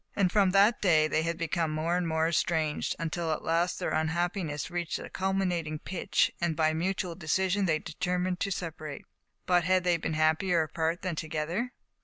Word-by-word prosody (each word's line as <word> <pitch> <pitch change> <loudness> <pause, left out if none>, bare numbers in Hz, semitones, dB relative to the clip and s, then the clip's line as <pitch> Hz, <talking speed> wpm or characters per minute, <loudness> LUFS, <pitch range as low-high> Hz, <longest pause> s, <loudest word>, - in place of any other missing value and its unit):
And 190 -3 +2
from 200 -2 +4
that 200 +4 +4
day 160 -5 +4
they 155 - +1
had 165 +1 -2
become 165 0 -1
more 155 +3 0
and 180 -1 0
more 160 0 +1
estranged, 160 -2 0
until 165 0 -2
at 155 - -2
last 170 +2 +1
their - - -2
unhappiness 160 -1 -1
reached 175 -1 -2
a - - -9
culminating 180 -5 -1
pitch, 180 +4 0
and 170 -2 0
by 155 0 +2
mutual 180 +2 -1
de 165 -2 -11
sire, 190 +4 +2
they 165 -4 +2
determined 180 +3 -2
to 200 - -1
separate. 160 -5 -5 0.4
But 175 -2 +3
had 185 0 +3
they 175 -1 +3
been 160 -1 -3
happier 160 +2 +2
apart 160 +2 -2
than 185 -3 -2
together? 160 +10 -3
170 Hz, 185 wpm, -29 LUFS, 160-185 Hz, 0.4 s, from